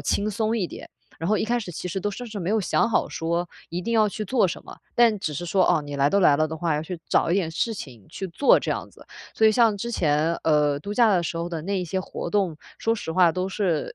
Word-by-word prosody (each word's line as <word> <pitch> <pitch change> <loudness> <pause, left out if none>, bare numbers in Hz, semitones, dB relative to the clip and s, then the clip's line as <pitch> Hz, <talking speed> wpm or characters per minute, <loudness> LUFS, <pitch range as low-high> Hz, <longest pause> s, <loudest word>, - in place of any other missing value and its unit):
轻 210 +1 0
松 220 +2 0
一 190 - 0
点， - - -10 0.3
然 165 - -3
后 215 - +3
一 - - 0
开 240 +2 0
始 200 - -6
其 180 - -6
实 190 +2 -3
都 205 - -1
甚 245 +5 -7
至 215 -2 -6
没 175 +2 -2
有 220 0 +2
想 210 - +1
好 - - +1
说 170 +1 -2 0.2
一 175 - -3
定 230 - -2
要 215 -1 +4
去 215 +2 -5
做 210 -3 +2
什 - - -6
么， - - -11 0.2
但 230 -3 +4
只 155 - -3
是 175 - -4
说， 185 +2 +3
哦， 155 - +2
你 145 0 -7
来 140 0 +3
都 200 - +3
来 145 -6 +5
了 155 +1 +1
的 160 - -5
话， 160 -1 0
要 150 - -1
去 170 +1 -6
找 - - +2
一 - - +3
点 185 -5 0
事 225 +7 -1
情 120 - -10
去 190 - -5
做 225 +11 +4
这 - - -3
样 - - -3
子。 - - -18 0.3
所 220 - +4
以 215 - +5
像 225 -2 +4
之 235 +4 -4
前， 155 -3 +1
呃， 150 -2 +3
度 200 +7 -5
假 230 -1 +5
的 180 - +2
时 165 0 -3
候 170 +1 -2
的 165 -3 -5
那 195 +2 -1
一 - - -3
些 185 +3 -2
活 - - -6
动， 190 -6 0 0.2
说 225 - +1
实 180 -7 -5
话 180 -1 +5
都 185 +2 -2
是 185 -6 -1
185 Hz, 310 characters per minute, -24 LUFS, 165-215 Hz, 0.3 s, 来